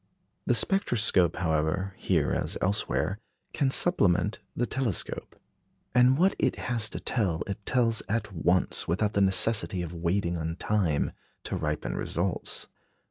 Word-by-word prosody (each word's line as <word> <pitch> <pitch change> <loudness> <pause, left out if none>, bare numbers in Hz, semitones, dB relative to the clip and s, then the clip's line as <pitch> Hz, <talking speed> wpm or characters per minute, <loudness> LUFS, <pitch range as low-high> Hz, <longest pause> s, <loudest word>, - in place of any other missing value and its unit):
The - - +3
spectroscope, 105 - +2
however, 80 +3 -1
here - - 0
as - - -2
elsewhere, 95 -1 -1 0.3
can 140 - +1
supplement 105 - +3 0.2
the 120 - 0
telescope; 125 -7 -2 0.6
and 125 +1 +5
what 185 +4 +3
it - - +1
has 115 -3 -2
to - - -5
tell, 95 -10 -1
it 100 +1 -6
tells 115 -3 +2
at 110 -1 -2
once, 90 +2 +1
without 100 +5 0
the 100 - +1
necessity 95 -1 +3
of 85 0 -6
waiting 85 +1 -1
on 80 0 -3
time 90 -6 0 0.3
to - - -4
ripen 75 -6 -3
results. 90 +2 -2
100 Hz, 135 wpm, -28 LUFS, 85-115 Hz, 0.6 s, and